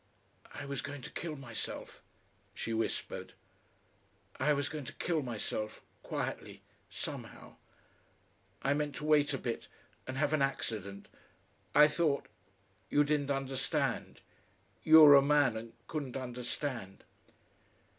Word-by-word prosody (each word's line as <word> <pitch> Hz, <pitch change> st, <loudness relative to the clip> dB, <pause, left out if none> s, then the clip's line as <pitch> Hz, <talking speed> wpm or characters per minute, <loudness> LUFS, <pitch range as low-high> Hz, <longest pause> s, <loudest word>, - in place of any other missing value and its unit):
"I 145 Hz, -, -6 dB
was 140 Hz, -2 st, -3 dB
going 145 Hz, -2 st, -7 dB
to -, -, -7 dB
kill 165 Hz, -2 st, -4 dB
myself," 130 Hz, -5 st, -6 dB, 0.5 s
she 115 Hz, -, -3 dB
whispered. 115 Hz, 0 st, -2 dB, 1.1 s
"I 145 Hz, +3 st, +3 dB
was 145 Hz, -1 st, +1 dB
going 150 Hz, -3 st, -5 dB
to 140 Hz, -, -7 dB
kill 165 Hz, -3 st, 0 dB
myself 110 Hz, -3 st, -4 dB, 0.2 s
quietly -, -, -4 dB, 0.3 s
somehow. -, -, -7 dB, 1.1 s
I 140 Hz, -, +3 dB
meant 145 Hz, -1 st, -1 dB
to 150 Hz, -, -5 dB
wait 150 Hz, -1 st, +4 dB
a 135 Hz, -, 0 dB
bit 120 Hz, -2 st, -4 dB, 0.4 s
and 130 Hz, 0 st, -4 dB
have 145 Hz, +1 st, +1 dB
an 155 Hz, -, +2 dB
accident. 105 Hz, -7 st, -2 dB, 0.7 s
I 150 Hz, 0 st, +9 dB
thought 150 Hz, -2 st, +1 dB, 0.6 s
you 145 Hz, -, +4 dB
didn't 145 Hz, -1 st, 0 dB
understand. 135 Hz, -1 st, -1 dB, 0.6 s
You 160 Hz, 0 st, +9 dB
were 150 Hz, -2 st, +11 dB
a 140 Hz, -, +9 dB
man, 145 Hz, -4 st, +4 dB
and 115 Hz, +1 st, -7 dB
couldn't 140 Hz, -5 st, -4 dB
understand...." 125 Hz, -4 st, -4 dB
140 Hz, 125 wpm, -33 LUFS, 125-150 Hz, 1.1 s, were